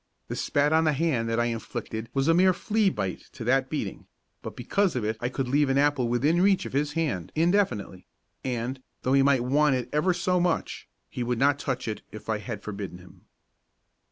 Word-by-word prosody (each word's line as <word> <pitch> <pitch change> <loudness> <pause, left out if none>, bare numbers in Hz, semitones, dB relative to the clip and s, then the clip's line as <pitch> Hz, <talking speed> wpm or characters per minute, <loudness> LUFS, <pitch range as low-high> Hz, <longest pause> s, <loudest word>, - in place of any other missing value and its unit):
The - - -3
spat 145 +2 +1
on 160 0 +4
the 155 - +3
hand 135 -7 0
that 115 +1 0
I 120 - +2
inflicted 115 -1 -4
was 135 +1 0
a 165 - +5
mere 185 +2 +5
flea 215 +2 +1
bite 100 - -4
to - - -7
that 130 +2 +2
beating, 125 -11 -4 0.3
but - - -7
because 200 -5 0
of 120 -4 -1
it 110 +1 -1
I 120 - -1
could 130 0 -3
leave 145 +2 +2
an 135 - +2
apple 145 -3 +2
within 145 +9 +2
reach 195 0 +3
of - - -7
his 145 +2 0
hand 145 - -2
indefinitely 160 - 0 0.4
and, 125 +1 -3 0.2
though 130 - +1
he 135 - +5
might 135 -3 +3
want 140 +2 +3
it 125 -2 -3
ever 150 +5 +3
so 180 +1 +1
much, 175 -1 -1 0.2
he - - -6
would 120 0 -1
not 140 +3 +3
touch 130 -3 -3
it 110 - -3
if 110 - -10
I 110 -1 0
had 110 -2 -6
forbidden 100 -4 -6
him. 90 0 -17
135 Hz, 210 wpm, -27 LUFS, 115-155 Hz, 0.4 s, a